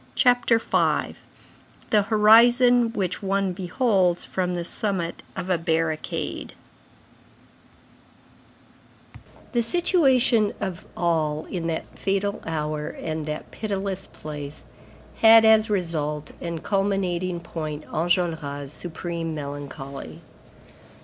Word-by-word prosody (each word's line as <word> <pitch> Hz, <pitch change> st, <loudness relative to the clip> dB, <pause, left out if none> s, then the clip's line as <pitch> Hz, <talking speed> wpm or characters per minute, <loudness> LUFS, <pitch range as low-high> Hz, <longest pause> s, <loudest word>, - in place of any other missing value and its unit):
CHAPTER 245 Hz, -3 st, +4 dB
V—THE 215 Hz, -1 st, -2 dB
HORIZON 235 Hz, +2 st, +6 dB
WHICH 190 Hz, -5 st, -2 dB
ONE 195 Hz, -1 st, 0 dB
BEHOLDS 185 Hz, -1 st, +1 dB
FROM 180 Hz, -1 st, -2 dB
THE 170 Hz, -1 st, -3 dB
SUMMIT 185 Hz, -5 st, -3 dB
OF 185 Hz, -, -3 dB
A 175 Hz, -, +2 dB
BARRICADE 160 Hz, -1 st, -2 dB, 3.0 s
The 240 Hz, -, +2 dB
situation 260 Hz, -, +3 dB
of 185 Hz, -2 st, -5 dB
all 155 Hz, -3 st, 0 dB
in 170 Hz, -3 st, -3 dB
that 165 Hz, -1 st, -2 dB
fatal 200 Hz, +1 st, -1 dB
hour 150 Hz, -1 st, -2 dB
and 155 Hz, -1 st, -5 dB
that 150 Hz, 0 st, -5 dB
pitiless 195 Hz, -2 st, -4 dB
place, 150 Hz, -1 st, -8 dB, 0.5 s
had 225 Hz, 0 st, +8 dB
as 220 Hz, 0 st, +5 dB
result 155 Hz, -6 st, -2 dB
and 170 Hz, -2 st, -5 dB
culminating 185 Hz, -3 st, 0 dB
point 155 Hz, -3 st, -6 dB
Enjolras' 160 Hz, -5 st, -1 dB
supreme 165 Hz, 0 st, -4 dB
melancholy. 140 Hz, -, -7 dB
180 Hz, 95 wpm, -24 LUFS, 160-210 Hz, 3.0 s, had